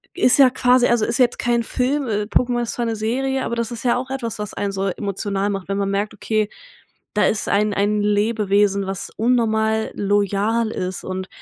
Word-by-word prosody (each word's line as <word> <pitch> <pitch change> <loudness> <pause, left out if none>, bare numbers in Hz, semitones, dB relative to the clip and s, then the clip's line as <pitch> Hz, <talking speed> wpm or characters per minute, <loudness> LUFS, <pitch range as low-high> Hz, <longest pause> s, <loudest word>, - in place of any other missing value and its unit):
ist 255 - +3
ja 265 -2 +8
quasi 250 0 +3
also, 235 -2 +2
ist 235 - -2
jetzt 245 -1 +3
kein 240 -1 +1
Film, 270 +4 -1
äh, 210 -2 -1
Pokemon 240 +1 +1
ist 235 - -4
zwar 240 - -2
'ne 225 - -1
Serie, 265 +5 -1
aber 235 - -2
das 235 0 -2
ist 235 -1 -7
ja 245 - +3
auch 255 +1 -5
etwas, 240 -5 -4
was 210 -1 -5
einen 200 -1 -2
so 195 0 -2
emotional 200 +1 -2
macht, 195 -2 -5
wenn 195 - -1
man 200 -1 0
merkt: 205 +2 -1
„Okay, 215 -1 -1 0.6
da 210 - +3
ist 210 - 0
ein 210 +1 +2
ein 205 +1 +1
Lebewesen, 205 -2 +1
was 195 0 -5
unnormal 220 -2 +1
loyal 205 +3 +1
ist 185 -3 -4
und 185 0 -4
215 Hz, 205 wpm, -21 LUFS, 200-240 Hz, 0.6 s, ja